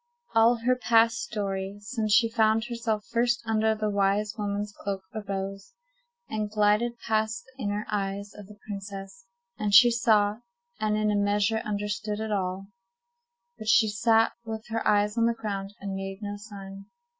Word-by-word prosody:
All 225 +2 +5
her 255 0 +4
past 230 0 +3
story, 200 -3 -3
since 215 +1 -3
she 230 +2 +6
found 220 -1 +2
herself 230 -3 -2
first 240 +1 +1
under 220 0 +2
the 215 -1 -1
wise 200 +1 +1
woman's 205 -1 -3
cloak, 195 -1 -4
arose, 195 - -5 0.5
and 215 -1 -3
glided 215 +3 +2
past 220 +1 -1
the 260 +1 -14
inner 205 +1 -2
eyes 200 0 -3
of 205 -2 -11
the 210 0 -14
princess, 195 +2 -7 0.3
and 205 -1 +2
she 240 +3 +9
saw, 215 -3 +3 0.4
and 215 0 +1
in 215 0 +1
a - - +1
measure 205 +2 +2
understood, 210 0 -3
it 220 0 -3
all. 190 -1 -2 0.9
But 215 - -8
she 220 0 +5
sat 225 +2 +3
with 220 0 -6
her 225 0 -1
eyes 210 +2 +2
on 230 - +4
the 235 - +1
ground, 200 -2 -5
and 195 -1 -5
made 195 +1 -5
no 205 0 -4
sign. 195 -2 -10
210 Hz, 165 wpm, -27 LUFS, 200-225 Hz, 0.9 s, she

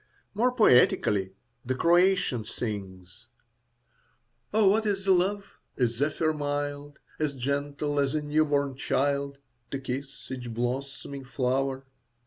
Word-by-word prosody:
More 240 +5 +2
poetically, 105 - +4 0.3
the 130 +1 -2
Croatian 175 - +3
sings: 100 -2 -7 1.2
Oh, 215 -1 +4
what 215 +2 +2
is 195 -1 -1
love? 195 +2 +1 0.2
a 125 - +3
zephyr 145 +7 0
mild, 145 -1 -3 0.2
As 150 -2 -1
gentle 145 +2 -2
as 140 +1 +1
a 155 - 0
new 150 +1 +2
born 140 -2 0
child, 140 +1 0 0.3
To 135 - -3
kiss 135 +1 -6
each 125 -2 -5
blossoming 135 +3 -4
flower. 130 +1 -1
140 Hz, 115 wpm, -27 LUFS, 125-155 Hz, 1.2 s, poetically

